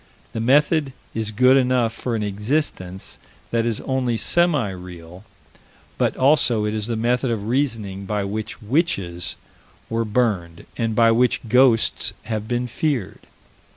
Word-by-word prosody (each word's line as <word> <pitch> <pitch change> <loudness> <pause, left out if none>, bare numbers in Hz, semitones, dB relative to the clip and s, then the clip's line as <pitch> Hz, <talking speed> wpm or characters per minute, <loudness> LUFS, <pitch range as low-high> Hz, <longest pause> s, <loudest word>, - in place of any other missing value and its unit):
The 115 - -4
method 145 +4 +2 0.2
is 110 -1 -2
good 125 +5 +4
enough 125 -3 +2
for 120 +1 -3
an 110 - -1
"existence" 100 -3 -3 0.3
that 115 0 +1
is 115 -2 -1
only 130 -3 -1
semi 150 - +2
real, 90 0 -10 0.8
but - - +1
also 130 -6 +4
it 105 - -1
is 110 -1 -1
the 115 - -1
method 125 +3 0
of 110 -3 -2
reasoning 110 -7 -2
by 105 -1 -1
which 105 +2 -5
witches 100 - -1 0.6
were 115 0 0
burned, 105 -7 -1
and 115 -2 -1
by 115 0 +5
which 120 +2 +2
ghosts 125 -1 +3
have 110 -1 -4
been 120 +1 -1
feared. 125 -3 -3
115 Hz, 145 wpm, -22 LUFS, 105-125 Hz, 0.8 s, by